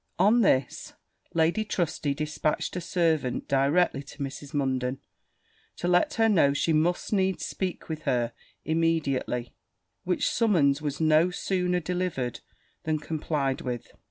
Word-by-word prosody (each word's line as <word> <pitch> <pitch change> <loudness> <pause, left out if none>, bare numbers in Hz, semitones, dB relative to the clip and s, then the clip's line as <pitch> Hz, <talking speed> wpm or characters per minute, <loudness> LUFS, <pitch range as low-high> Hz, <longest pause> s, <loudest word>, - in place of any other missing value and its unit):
On 210 +6 +5
this, 130 - +1 0.4
Lady 165 +6 +2
Trusty 160 -8 -1
dispatched 150 +2 -2
a 180 - -2
servant 160 -7 0
directly 140 +2 +2
to 145 - -13
Mrs. 140 0 -6
Munden, 130 -2 -1 0.8
to 175 - -2
let 180 0 +3
her 225 -1 +4
know 160 -10 +4
she 160 +3 +1
must 170 +6 +1
needs 190 -2 +1
speak 185 -2 -4
with 155 -1 -4
her 120 -4 0 0.3
immediately, 155 -7 0 0.5
which 180 0 0
summons 155 -11 +2
was 145 -2 -3
no 160 +2 +4
sooner 180 0 0
delivered 175 -8 -2 0.4
than 155 -1 0
complied 150 -3 -2
with. 120 -1 -5
155 Hz, 130 wpm, -27 LUFS, 140-180 Hz, 0.8 s, On